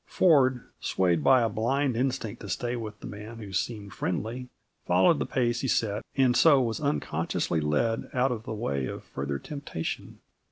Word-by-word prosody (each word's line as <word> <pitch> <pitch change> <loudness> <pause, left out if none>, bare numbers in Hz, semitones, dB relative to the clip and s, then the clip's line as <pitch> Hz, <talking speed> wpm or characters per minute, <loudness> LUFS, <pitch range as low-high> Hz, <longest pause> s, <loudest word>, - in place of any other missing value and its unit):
Ford, 130 -8 +4 0.2
swayed 85 -4 +1
by 130 - +6
a - - +3
blind 125 +5 0
instinct 125 -4 -2
to 100 - -8
stay 120 +6 -2
with 110 -3 -6
the - - -8
man 105 +3 -8
who 105 -4 -8
seemed 100 0 -3
friendly, 115 +9 -3 0.3
followed 95 - +4
the - - -1
pace 120 -2 0
he 135 - -1
set 105 -4 0
and 130 -2 +4
so 145 0 +6
was 115 -1 -1
unconsciously 140 - -1
led 75 +10 0
out 130 +1 +2
of 115 -3 -3
the 115 - -7
way 70 - -2
of - - -6
further 70 0 -4
temptation. 140 - -5
115 Hz, 175 wpm, -28 LUFS, 100-130 Hz, 0.3 s, by